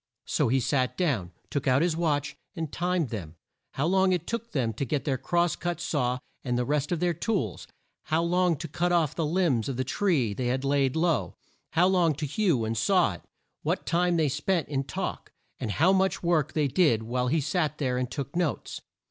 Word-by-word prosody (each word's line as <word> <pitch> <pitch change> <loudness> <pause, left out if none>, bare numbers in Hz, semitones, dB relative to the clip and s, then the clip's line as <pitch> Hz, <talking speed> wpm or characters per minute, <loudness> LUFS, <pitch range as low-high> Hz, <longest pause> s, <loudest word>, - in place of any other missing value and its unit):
So - - +1
he 130 +3 +2
sat 130 0 0
down, 125 - 0 0.2
took 140 -1 -2
out 130 +4 +4
his 170 -2 +1
watch, 150 -4 0 0.2
and 160 -4 -4
timed 175 -4 0
them: 90 -8 -6 0.4
how 140 - -1
long 190 +2 +3
it 175 -2 -1
took 230 0 -4
them 120 -5 0
to 115 - -3
get 140 +2 -2
their 135 -3 0
cross 175 +2 +1
cut 175 -2 -3
saw 125 -8 0 0.3
and 125 -2 -1
the 125 - 0
rest 150 +2 0
of 175 - 0
their 175 0 +1
tools; 170 - -2 0.4
how 160 +2 +1
long 175 -1 +2
to 165 - -5
cut 175 +4 -1
off 165 -5 +2
the 165 - -2
limbs 155 - +1
from 135 - -2
the 130 - -1
tree 135 - +1
they 125 +4 -2
had 130 +2 -1
laid 140 -1 +2
low; 165 0 +1 0.4
how 170 +2 +4
long 180 -5 +3
to 150 - -3
hew 150 - +1
and 110 0 -1
saw 180 - +3
it; 85 - -11 0.4
what - - -1
time 175 0 +2
they 155 -2 +3
spent 170 +4 0
in 135 -2 -1
talk; - - -4 0.3
and 105 - -2
how 180 +5 +4
much 190 -1 +1
work 165 -4 +1
they 150 -2 +2
did 130 - +3
while 125 +2 -1
he 155 +6 +2
sat 155 +1 -1
there 125 -3 0
and 125 -1 -2
took 140 +2 -5
notes. 175 -4 -2
150 Hz, 215 wpm, -27 LUFS, 130-175 Hz, 0.4 s, out